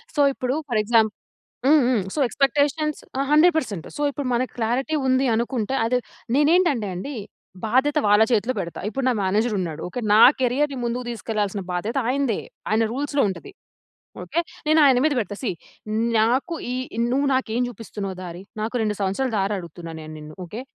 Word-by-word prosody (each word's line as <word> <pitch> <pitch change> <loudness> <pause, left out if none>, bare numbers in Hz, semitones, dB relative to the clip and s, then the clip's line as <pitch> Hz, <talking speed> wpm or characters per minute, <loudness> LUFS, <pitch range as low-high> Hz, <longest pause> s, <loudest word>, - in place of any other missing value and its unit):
So, 290 - +3
ఇప్పుడు 255 0 -2 0.2
for 220 -3 +1
exam 225 0 +4 0.6
హ్మ్, 295 0 +6
హ్మ్. 225 -7 +1
సో, 300 - -1
ఎక్స్పెక్టేషన్స్ 290 +3 +1 0.2
ఆ! - - +1
100% 305 - +3
సో, 295 - -3
ఇప్పుడు 280 -2 -4
మనకు 255 +2 -1
క్లారిటీ 245 +7 0
ఉంది 260 +1 +3
అనుకుంటే, 235 +1 -1
అది 250 +2 +2 0.4
నేనేంటంటే 295 - +3
అండి, 270 +11 -5 0.5
బాధ్యత 265 +6 +2
వాళ్ళ 210 +1 +6
చేతిలో 230 +4 +1
పెడతా. 170 - -5
ఇప్పుడు 255 +5 -3
నా - - +3
మేనేజరున్నాడు. 190 -5 0
ఓకె, 245 - -4
నా 220 - +7 0.2
కేరియర్‌ని 265 +2 +1
ముందుకు 240 +1 -2
తీసుకెళ్ళాల్సిన 210 -3 -2
బాధ్యత 205 +8 -2
ఆయనదే. 265 -4 +1 0.3
ఆయన 220 +1 +2
రూల్స్‌లో 280 +1 0
ఉంటది. 295 - -7 0.7
ఓకె. 340 - 0 0.3
నేను 310 +1 +5
ఆయన 265 -3 +6
మీద 310 -1 +3
పెడతా 205 -3 -2
సీ 250 - -1 0.7
నాకు 255 +10 +2 0.2
ఈ - - -2 0.4
నువ్వు 275 +2 +2
నాకు 260 -1 +1
ఏమి 245 0 +1
చూపిస్తున్నావు 205 -4 -6
దారి? 175 +1 -7 0.2
నాకు, 220 +3 -3
2 210 -1 0
సంవత్సరాల 200 +7 0
దారి 195 +2 0
అడుగుతున్నాను. 170 -1 -8
నేను 155 0 -9
నిన్ను 150 0 -11
ఓకె. 210 +8 -7
240 Hz, 165 wpm, -23 LUFS, 205-275 Hz, 0.7 s, నా